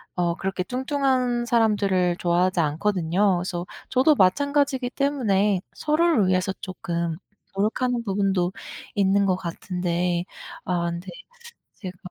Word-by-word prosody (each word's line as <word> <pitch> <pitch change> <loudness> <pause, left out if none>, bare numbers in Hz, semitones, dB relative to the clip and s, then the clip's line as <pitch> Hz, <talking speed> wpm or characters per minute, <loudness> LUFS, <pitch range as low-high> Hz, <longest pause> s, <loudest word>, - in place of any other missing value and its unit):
어 175 -1 0
그렇게 190 0 -3
뚱뚱한 255 0 0
사람들을 200 -7 +2
좋아하지 180 +1 +1
않거든요. 180 +4 +1
그래서 175 0 -3 0.2
저도 265 +4 +4
마찬가지이기 275 +4 +2
때문에 210 -10 +1
서로를 305 - +2
위해서 185 +1 +1
쪼끔 170 -3 -3 0.4
노력하는 235 +4 0
부분도 195 -3 0 0.4
있는 200 0 +3
것 185 -1 +2
같은데 175 0 -2 0.4
아 175 -3 0
근데 170 +2 -6 0.7
제가 185 -3 -8
195 Hz, 295 characters per minute, -24 LUFS, 180-240 Hz, 0.7 s, 저도